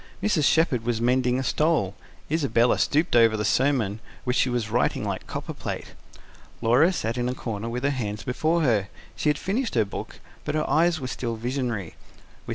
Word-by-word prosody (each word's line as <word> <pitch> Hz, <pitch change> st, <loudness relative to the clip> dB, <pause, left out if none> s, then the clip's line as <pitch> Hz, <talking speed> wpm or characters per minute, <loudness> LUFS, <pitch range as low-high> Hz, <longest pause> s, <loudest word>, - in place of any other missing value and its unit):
Mrs. 185 Hz, -9 st, +2 dB
Shepherd 140 Hz, -8 st, +3 dB
was 120 Hz, -1 st, -1 dB
mending 125 Hz, +1 st, +2 dB
a 130 Hz, -, -1 dB
stole; 150 Hz, -, +1 dB, 0.4 s
Isabella 135 Hz, -7 st, +2 dB
stooped 155 Hz, -1 st, +2 dB
over 115 Hz, -2 st, +5 dB
the 105 Hz, -, -1 dB
sermon, 115 Hz, -4 st, +1 dB, 0.2 s
which 125 Hz, 0 st, 0 dB
she 130 Hz, -, +3 dB
was 120 Hz, -3 st, -2 dB
writing 120 Hz, +2 st, +1 dB
like -, -, -4 dB
copperplate. -, -, -5 dB, 0.7 s
Laura 130 Hz, +10 st, +4 dB
sat 120 Hz, -9 st, -2 dB
in 120 Hz, 0 st, 0 dB
a 125 Hz, -, -3 dB
corner 115 Hz, -2 st, -4 dB
with 125 Hz, +2 st, -4 dB
her 140 Hz, -, +2 dB
hands 105 Hz, -6 st, -3 dB
before 160 Hz, +6 st, 0 dB
her: 110 Hz, -8 st, +2 dB, 0.3 s
she 150 Hz, -, 0 dB
had 150 Hz, -, +2 dB
finished 220 Hz, -, -2 dB
her 110 Hz, -3 st, +3 dB
book, 100 Hz, -, -7 dB, 0.2 s
but 150 Hz, -, -2 dB
her 155 Hz, -, 0 dB
eyes 165 Hz, +1 st, +3 dB
were 130 Hz, -, -5 dB
still 120 Hz, -2 st, -3 dB
visionary. 115 Hz, -, -3 dB
125 Hz, 180 wpm, -25 LUFS, 115-150 Hz, 0.7 s, over